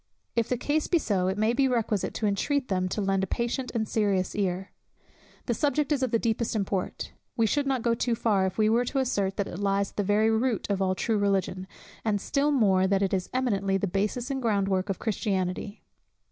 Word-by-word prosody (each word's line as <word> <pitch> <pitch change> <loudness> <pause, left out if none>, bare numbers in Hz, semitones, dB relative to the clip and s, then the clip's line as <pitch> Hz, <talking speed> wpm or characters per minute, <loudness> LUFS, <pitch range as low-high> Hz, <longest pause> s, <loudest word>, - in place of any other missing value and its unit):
If 230 -1 +1
the 250 - +1
case 295 +5 0
be 350 - +3
so, 195 - 0
it 190 +1 -1
may 215 +2 +2
be 270 +2 +3
requisite 225 -5 -1
to 220 - -1
intreat 255 +7 0
them 185 -1 0
to 210 - -2
lend 195 -1 +1
a - - -1
patient 240 +5 -2
and 220 -1 +1
a - - -15
serious 200 -4 0
ear. 190 -1 -2 0.7
The 240 - 0
subject 290 +4 0
is 285 -3 +2
of 260 - +1
the 230 - +2
deepest 230 0 -1
import. 195 -3 -2 0.2
We 230 - +3
should 280 +6 +1
not 260 -4 0
go 235 - +2
too 230 0 0
far 205 -4 +2
if 185 - -6
we 215 -1 +3
were 235 +3 +3
to 270 - -3
assert, 200 -7 0
that 200 - -1
it 175 - -7
lies 200 0 0
at - - -32
the 205 - +1
very 210 +3 +3
root 225 0 0
of 195 -1 0
all 185 -1 +1
true 220 +2 0
Religion, 195 -2 0 0.4
and 210 -2 +1
still 280 +7 0
more, 195 -8 +3
that 195 0 +2
it 195 - 0
is 185 -1 -1
eminently 200 -7 +1
the 195 - -1
basis 210 +7 -1
and 270 -1 -2
ground 205 -5 +1
work 190 +1 0
of 195 - -1
Christianity. 200 -2 -2
210 Hz, 230 wpm, -27 LUFS, 195-240 Hz, 0.7 s, be